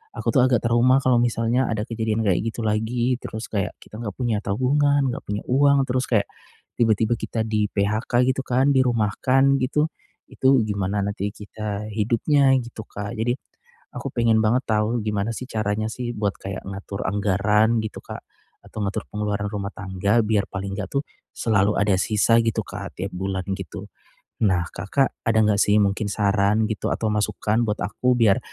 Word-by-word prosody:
aku - - -2
tuh 130 - +6
agak 125 -3 +2
trauma 125 +3 +4
kalau 130 -1 +4
misalnya 120 +1 +1
ada 105 -1 -1
kejadian 110 -1 -1
kayak 90 -3 +3
gitu - - -10
lagi, 115 +4 0
terus 110 +1 -6
kayak, 100 -3 -1
kita 105 - -11
enggak 105 - -3
punya 115 -4 0
tabungan, 140 +4 +2
enggak - - -8
punya 105 0 -3
uang, 140 +1 +4
terus 130 +1 0
kayak, 105 -4 +2 0.5
tiba-tiba 110 0 +3
kita 115 - -3
di 105 -1 +1
PHK 110 +5 +1
gitu 135 - -3
kan 130 +3 +2
dirumahkan 130 +3 +3
gitu. 150 +4 +1 0.4
Itu 130 -2 +3
gimana 100 0 -1
nanti 100 0 -3
kita 105 0 -5
hidupnya, 120 +6 +2
gitu 120 -2 -8
Kak. 105 +3 -6
Jadi, 115 +2 0 0.6
aku - - -4
pengen 115 -2 +3
banget 120 +5 +2
tahu 110 +2 +1
gimana 105 +1 -1
sih 125 - -6
caranya 110 0 -1
sih 120 -1 -4
buat 105 -2 -1
kayak 95 0 -6
ngatur 100 0 -5
anggaran, 105 +3 +2
gitu 110 - -6
Kak. - - -8 0.4
Atau 110 - -7
ngatur 100 - -3
pengeluaran 105 -1 -2
rumah 100 -1 -3
tangga 100 +3 0
biar 105 -2 +1
paling 100 0 -4
enggak 100 - -4
tuh, 140 - +2 0.4
selalu 105 -2 +2
ada 105 -1 +3
sisa 110 +2 +3
gitu 115 -2 0
Kak - - -8
tiap 95 +1 -3
bulan 95 0 -2
gitu. 95 +2 -7 0.6
Nah 90 -3 +2
Kakak, 135 +8 0 0.2
ada 110 -1 +3
enggak 105 -1 +2
sih 105 +1 +4
mungkin 100 +1 0
saran 105 +1 +2
gitu 110 - -2
atau 110 - -2
masukan 105 +2 0
buat 105 - -1
aku 125 +6 +1
biar 110 -5 +4
110 Hz, 175 wpm, -23 LUFS, 100-120 Hz, 0.6 s, tuh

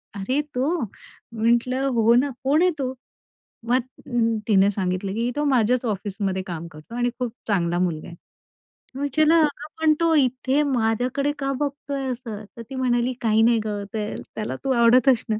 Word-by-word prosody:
"अरे 255 +9 0
तो?" 260 +5 +1
म्हंटलं, 235 +5 -1
"हो 235 -2 +4
ना 275 +3 +3
कोण 290 +5 +3
आहे 365 - +4
तो?" 260 -1 -2 0.8
मग 255 +2 +4 0.7
तिने 200 -1 +5
सांगितलं, 190 0 -2
"की 235 +2 0
तो 295 - 0
माझ्याच 245 +2 +2
ऑफिसमध्ये 195 -1 -3
काम 170 -2 -5
करतो 155 +9 -12
आणि 245 0 +1
खूप 240 -3 -2 0.2
चांगला 175 -3 +1
मुलगा 170 -4 -1
आहे." 170 - -10 0.8
मग 275 - -5
विचारलं, 310 +3 +3
"अगं 295 0 -1
पण 310 -1 +5
तो 330 -1 +3
इथे 260 +1 +2
माझ्याकडे 245 +5 0
का 275 0 -1
बघतोय 280 -1 -3
असं?" 230 -4 -6
तर - - -6
ती 270 - -6
म्हणाली 250 -1 +1
काही 220 -1 +3
नाही 230 0 +4
गं 205 -1 -3
त्याला 215 -5 -4
तू 270 - 0
आवडत 240 +1 +5
असणार." 225 -3 +1
240 Hz, 165 wpm, -23 LUFS, 210-270 Hz, 0.8 s, तिने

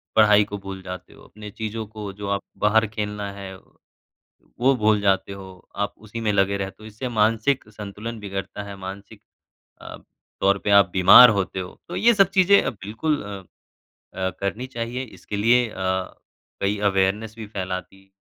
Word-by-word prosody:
पढ़ाई 105 -1 +6
को 105 0 -6
भूल 95 -1 -8
जाते 90 -1 -8
हो, - - -17
अपने 105 0 -11
चीज़ों 110 +1 -5
को 105 -2 -7
जो 100 +1 -7
आप 100 0 0 0.2
बाहर 110 +1 +3
खेलना 105 -1 -4
है, 100 -1 -8 1.0
वो 135 +2 +4
भूल 110 -3 +2
जाते 100 0 +1
हो, 95 -1 -12
आप 100 - -2
उसी 110 +2 -8
में 105 -2 +1
लगे 100 0 +2
रहते 95 +2 -6
हो - - -9
इससे 110 +4 -6
मानसिक 115 +4 +1
संतुलन 105 +2 -7
बिगड़ता 100 0 -5
है, 100 -1 -8
मानसिक 100 +3 -9 0.6
अ, - - -9 0.4
तौर 100 0 +3
पे 105 - 0
आप 100 -2 +6
बीमार 115 +6 +9
होते 95 -2 -1
हो। 90 - -8
तो - - -5
ये 235 +1 +4
सब 195 -2 +4
चीज़ें 195 +1 +5
बिल्कुल 110 +10 -3
अ 100 -2 -7 0.8
अ, 95 0 0
करनी 100 +6 -3
चाहिए। 120 0 -4
इसके 105 -3 -8
लिए 120 +3 +3
अ, - - -12 0.9
कई 100 +1 0
अवेयरनेस 100 +3 0
भी 110 -2 -7
फैलाती। 95 -1 -6
105 Hz, 170 wpm, -23 LUFS, 100-110 Hz, 1.0 s, बीमार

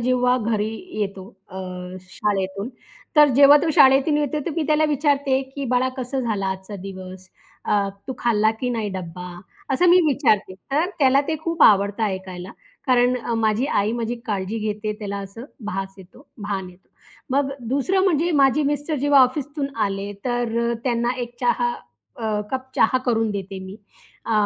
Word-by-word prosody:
जेव्हा 250 +1 +2
घरी 215 -2 -1 0.3
येतो 195 -1 -4 0.2
अ, - - -14 0.6
शाळेतून 200 +1 -2 0.5
तर 295 -1 +8
जेव्हा 285 +1 +8
तो 330 - +1
शाळेतून 270 +3 +5
येतो 295 +1 -1
तर - - 0
मी 325 - +1
त्याला 310 0 +3
विचारते, 285 -2 +1
की 270 +1 -7
"बाळा 250 0 +1
कसं 260 +1 -3
झालं 220 -5 -2
आजचा 190 +2 -5
दिवस? 185 -1 -9 0.4
अ, 200 -1 +1 0.2
तू - - -1
खाल्ला 220 -2 +2
की 250 - -1
नाही 225 -3 -2
डब्बा?" 180 0 -7 0.5
असं 355 +6 +3
मी 365 - +7
विचारते. 225 -9 +2 0.2
तर 305 +6 +1
त्याला 270 -1 +5
ते 315 - 0
खूप 335 -2 0
आवडतं 200 +1 +5
ऐकायला, 190 -2 -5 0.4
कारण 250 0 +3
अ, 235 -1 -3
माझी 220 +3 +1
आई 210 -6 +1
माझी 235 0 -2
काळजी 205 +1 -2
घेते, 210 0 -3
त्याला 200 -2 -4
असं 200 +4 -8 0.2
भास 195 -1 -4
येतो, 190 - -16 0.2
भान 195 -2 -3
येतो. 180 +1 -22 0.4
मग 275 +1 +1 0.2
दुसरं 365 +9 +1
म्हणजे 345 -2 +2
माझे 275 +3 +3
मिस्टर 290 +2 -1
जेव्हा 285 0 +4
ऑफिसतून 280 +3 -1 0.2
आले 195 +1 -4
तर 240 -2 -1
अ, - - +1
त्यांना 240 -1 +1
एक 240 0 -7
चहा 240 0 +1 0.5
अ, 215 -2 -1
कप 260 0 -4
चहा 255 +3 +4
करून 225 -2 +1
देते 195 -1 -5
मी. 190 +2 -9 0.5
अ, 230 - -1
235 Hz, 165 wpm, -22 LUFS, 200-275 Hz, 0.6 s, तर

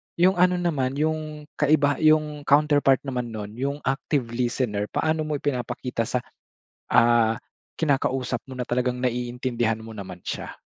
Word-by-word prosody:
yung 180 +1 +3
ano 180 0 +5
naman, 145 -7 0
yung 155 0 -2 0.2
kaibaha 145 -2 +3
yung 155 -2 +3
counterpart 145 -2 +4
naman 125 -3 -3
nun, 105 -1 -5
yung 140 +2 -1
active 135 +1 0
listener. 120 -4 -1
Paano 155 +3 0
mo 150 - -1
ipinapakita 125 -4 -2
sa, 125 -1 -1 0.7
ah, 115 -1 +5 0.4
kinakausap 135 -5 0
mo 130 - -7
na 125 - -2
talagang 125 +1 0
naiintindihan 120 -2 -1
mo 115 - -9
naman 95 -4 -8
siya? - - -5
130 Hz, 140 wpm, -25 LUFS, 120-150 Hz, 0.7 s, ano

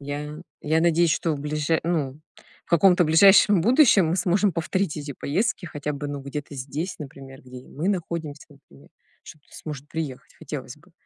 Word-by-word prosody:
Я 145 +2 -6 0.2
я 160 +2 +1
надеюсь, 170 -1 +3
что 165 - 0
в - - -7
ближе 150 +2 -1
ну, 155 -5 -2 0.5
в - - -32
каком-то 175 +1 +5
ближайшем 190 +4 +6
будущем 230 - +5
мы 170 - 0
сможем 190 +3 +2
повторить 165 +1 -2
эти 145 -1 -6
поездки 180 - -2
хотя 150 -2 -4
бы, 145 +1 -5
ну, 145 -1 -5
где-то 140 +1 -7
здесь, 145 +7 -5
например, 135 -2 -10
где 125 0 -11
и 125 - -16
мы 165 +6 -3
находимся, 165 -6 -4
например, 70 - -20 0.3
что 155 - -13
кто-то 145 - -23
сможет 145 -2 -8
приехать, 155 -6 -6
хотелось - - -7
бы. - - -24
155 Hz, 180 wpm, -24 LUFS, 145-175 Hz, 0.5 s, ближайшем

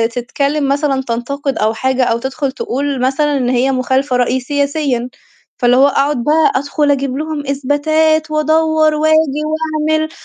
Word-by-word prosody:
تتكلم 280 +4 -1
مثلًا 280 -1 0
تنتقد 275 +4 -3
أو 215 +1 +1
حاجة، 260 +3 0
أو 230 -2 +1
تدخل 265 +3 -3
تقول 275 +1 -3
مثلًا 280 +3 +1
إن 250 -2 -1
هي 255 +2 +1
مخالفة 260 +1 0
رأي 250 +1 +1
سياسيًا. 280 -2 -1 0.5
فاللي 245 -1 +3
هو 275 +2 +6
أقعد 280 -2 0
بقى 305 +3 +3
أدخل 285 +2 0
أجيب 275 -1 -1
لهم 305 -1 -4
إثباتات، 310 +3 +1
وأدوّر 315 0 +2
وآجي 310 -1 +2
وأعمل، 315 0 -1
280 Hz, 145 wpm, -15 LUFS, 260-310 Hz, 0.5 s, هو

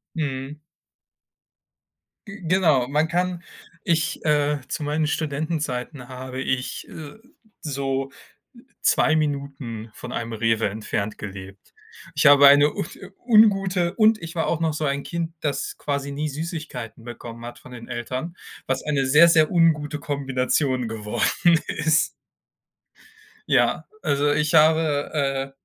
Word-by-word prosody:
Mhm. 145 -1 -4 1.7
G 195 +1 -10
Genau, 160 -8 +3
man 150 +3 +1
kann 180 +1 -2 0.4
ich, 165 -2 0
äh, 150 -1 +2
zu - - -3
meinen 150 +1 0
Studentenzeiten 145 -4 -3
habe 130 0 -7
ich, 130 -1 -2
äh, 150 -3 -10 0.5
so 135 -2 -2 0.7
2 155 - +4
Minuten 140 -7 -3
von - - -8
einem 115 0 -4
Rewe 115 -1 +1
entfernt 105 0 -3
gelebt. 95 -1 -10 0.4
Ich - - +1
habe 145 0 +8
eine 145 +1 +6
un - - -4 0.4
ungute 195 -6 +4
und 220 -1 +4
ich 165 +1 -7
war 165 - 0
auch 165 - 0
noch 160 -2 +1
so 155 0 -2
ein 140 0 -1
Kind, 170 -1 -4
das 140 -2 -2
quasi 140 -1 -3
nie 150 +2 -3
Süßigkeiten 145 -7 -6
bekommen 120 0 -9
hat 120 0 -9
von 130 - -15
den 115 -1 -10
Eltern, 130 +7 -5 0.3
was 130 - -2
eine 140 -3 0
sehr, 150 +6 +7
sehr 160 -2 +4
ungute 155 -4 +2
Kombination 135 -3 -1
geworden 115 +10 +1
ist. 150 -1 +3 1.4
Ja, - - +2 0.2
also, 145 +1 +1
ich 150 +1 +1
habe, 155 -2 +3
äh 135 -2 -1
145 Hz, 130 wpm, -23 LUFS, 130-160 Hz, 1.7 s, habe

